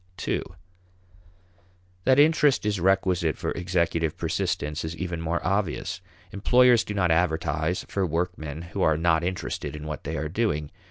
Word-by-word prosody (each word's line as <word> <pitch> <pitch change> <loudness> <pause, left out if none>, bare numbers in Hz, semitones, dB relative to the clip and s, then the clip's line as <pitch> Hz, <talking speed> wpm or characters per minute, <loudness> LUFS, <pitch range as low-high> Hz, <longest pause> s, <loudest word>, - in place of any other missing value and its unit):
(ii) - - +1 1.6
That 130 0 +5
interest 150 -5 +4
is 105 -2 0
requisite 90 -3 +2
for - - -3
executive 85 -3 -1
persistence 75 0 -2
is 80 +1 -4
even 85 -1 -4
more 85 +1 -1
obvious. 95 -2 -1 0.3
Employers 125 +3 +4
do 105 - -5
not 90 -4 +2
advertise 80 0 0
for 100 - -1
workmen 85 -2 -3
who 85 - -5
are 80 -1 +3
not 80 0 +2
interested 90 -3 -3
in 75 0 -7
what 75 -1 -5
they - - -4
are 80 - -2
doing. 80 -5 -1
85 Hz, 150 wpm, -26 LUFS, 80-95 Hz, 1.6 s, That